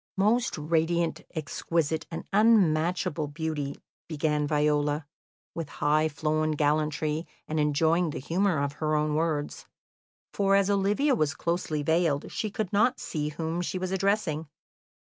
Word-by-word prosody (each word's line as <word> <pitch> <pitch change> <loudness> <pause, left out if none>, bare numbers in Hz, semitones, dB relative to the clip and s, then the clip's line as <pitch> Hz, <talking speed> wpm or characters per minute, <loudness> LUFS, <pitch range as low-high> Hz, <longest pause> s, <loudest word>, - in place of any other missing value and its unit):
"Most 230 +5 +2
radiant, 165 +2 0
exquisite, 160 +1 -1
and 165 - -5
unmatchable 180 -6 +3
beauty," 150 -2 -3 0.3
began 150 -2 0
Viola, 150 0 +1 0.5
with 165 -3 -5
high 155 +2 +1
flown 155 +1 0
gallantry, 150 +1 0 0.2
and 155 0 -1
enjoying 160 +3 +2
the - - -5
humour 175 +5 +1
of 140 0 0
her 155 0 +1
own 150 0 +1
words, 155 -2 -2 0.7
for, 195 -1 +3
as 200 0 +3
Olivia 205 +9 +2
was 155 - +1
closely 170 -3 -2
veiled, 160 -2 +1
she 215 - -2
could 205 -2 -4
not 240 +5 +3
see 150 -2 -3
whom 160 +3 -3
she 180 - -3
was 185 0 -3
addressing. 190 -5 0
160 Hz, 135 wpm, -27 LUFS, 150-180 Hz, 0.7 s, unmatchable